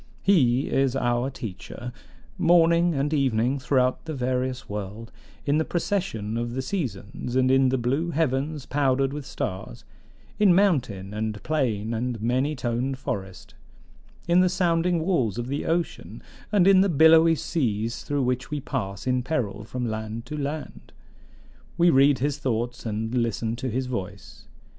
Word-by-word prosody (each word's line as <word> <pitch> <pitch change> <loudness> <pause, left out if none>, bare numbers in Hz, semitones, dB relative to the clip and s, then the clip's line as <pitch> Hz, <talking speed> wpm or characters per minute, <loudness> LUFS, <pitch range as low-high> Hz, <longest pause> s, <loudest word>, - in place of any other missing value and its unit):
"He 135 -9 +3
is 135 -1 +1
our 120 0 0
teacher. 120 0 -7 0.4
Morning 170 0 +4
and 140 +3 0
evening 130 -2 +1
throughout 130 0 +1
the 160 -2 -4
various 130 0 -2
world, 105 +3 -6 0.3
in 145 +2 +2
the - - +2
procession 165 - -2
of 120 +1 -3
the 130 - -2
seasons, 130 - -4
and 130 0 +3
in 135 0 +4
the 130 - +1
blue 135 +8 0
heavens 145 -2 -1
powdered 135 0 +1
with 145 -2 -6
stars; 95 -11 -5 0.5
in 200 -4 +5
mountain 125 - +1
and 105 -1 -3
plain 115 -8 -1
and 120 0 -2
many 130 +7 0
toned 130 +1 -2
forest; 95 -8 -6 0.7
in 175 +1 +4
the 185 0 +4
sounding 175 -2 +1
walls 130 - +1
of 120 - -2
the 140 +4 -3
ocean, 165 +1 -2 0.3
and 200 -4 +4
in 195 -1 +7
the 200 - +3
billowy 160 +1 +6
seas 115 - -2
through 145 -2 -1
which 125 0 -1
we 150 -1 -2
pass 100 -8 -4
in 125 -1 +1
peril 115 -7 -2
from 125 +3 -4
land 110 +1 -5
to 150 - -6
land, 150 +1 -5 0.8
we 175 0 +5
read 135 0 +5
his 145 +3 -1
thoughts 120 -2 -2
and 110 +2 -3
listen 115 -2 -1
to 130 +2 -4
his 130 +3 -2
voice. 120 -8 -6
130 Hz, 155 wpm, -25 LUFS, 115-155 Hz, 0.8 s, in